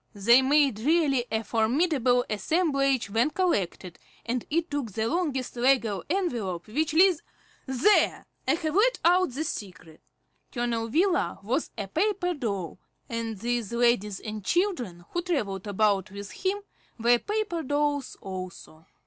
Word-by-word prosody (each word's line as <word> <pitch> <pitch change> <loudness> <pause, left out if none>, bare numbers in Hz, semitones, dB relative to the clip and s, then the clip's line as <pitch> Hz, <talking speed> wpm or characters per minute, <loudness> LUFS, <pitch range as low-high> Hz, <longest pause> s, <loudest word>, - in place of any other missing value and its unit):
They 235 +6 +5
made 275 -4 +3
really 280 -2 +2
a 220 0 0
formidable 245 - +2
assemblage 275 - 0
when 230 +7 +2
collected, 195 - -1 0.3
and 240 0 -2
it 335 +2 -1
took 280 -7 -3
the 220 +2 -1
longest 290 -6 -2
legal 240 -6 +2
envelope 235 - -2
which 305 +8 -1
Liz 360 -1 +5 0.5
There! 265 +11 +3 0.2
I 270 - +4
have 315 -2 -3
let 465 +7 +3
out 360 +1 +4
the 270 +5 -3
secret. 180 - -7 0.5
Colonel 235 -2 -1
Wheeler 345 - +1
was 255 +9 -1
a 200 -2 -4
paper 360 - 0
doll, 200 - -4 0.3
and 230 -2 -3
these 235 0 -2
ladies 235 -5 +1
and 215 -2 -6
children 245 - -1
who 345 - -1
travelled 215 - -2
about 205 -1 +1
with 200 +1 -8
him 395 +2 -2 0.3
were 240 +1 +4
paper 415 - -2
dolls 290 -1 -1
also. 185 -4 -8
245 Hz, 140 wpm, -27 LUFS, 210-320 Hz, 0.5 s, They